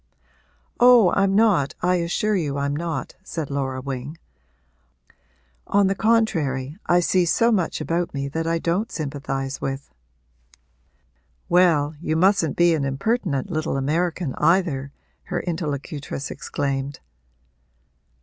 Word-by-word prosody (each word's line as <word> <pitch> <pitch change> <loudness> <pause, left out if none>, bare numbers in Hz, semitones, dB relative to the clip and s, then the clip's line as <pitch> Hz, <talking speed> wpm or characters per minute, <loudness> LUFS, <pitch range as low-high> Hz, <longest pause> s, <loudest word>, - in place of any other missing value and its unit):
'Oh, 240 -6 +7
I'm 195 0 +2
not 200 -10 +3
I 180 0 +3
assure 175 +5 0
you 145 -6 -1
I'm 140 0 -1
not,' 165 +1 -4
said 160 -6 -5
Laura 130 -2 -2
Wing. 135 +3 -6 1.5
'On 200 0 +3
the 195 - +2
contrary, 160 - +1
I 175 0 +4
see 180 +1 +2
so 230 +7 +3
much 190 -7 0
about 170 +1 -1
me 140 -1 -3
that 160 +3 -3
I 165 0 +1
don't 175 +7 -1
sympathise 140 -2 -4
with.' 135 +1 -5 1.6
'Well, 165 -4 +4
you 160 -2 -1
mustn't 175 -3 +3
be 175 -1 +5
an 155 -3 0
impertinent 145 - -1
little 155 -3 -1
American 160 +2 -1
either!' 165 -6 +2 0.3
her 175 - -2
interlocutress 150 -4 -4
exclaimed. 140 0 -3
165 Hz, 120 wpm, -23 LUFS, 140-180 Hz, 1.6 s, Oh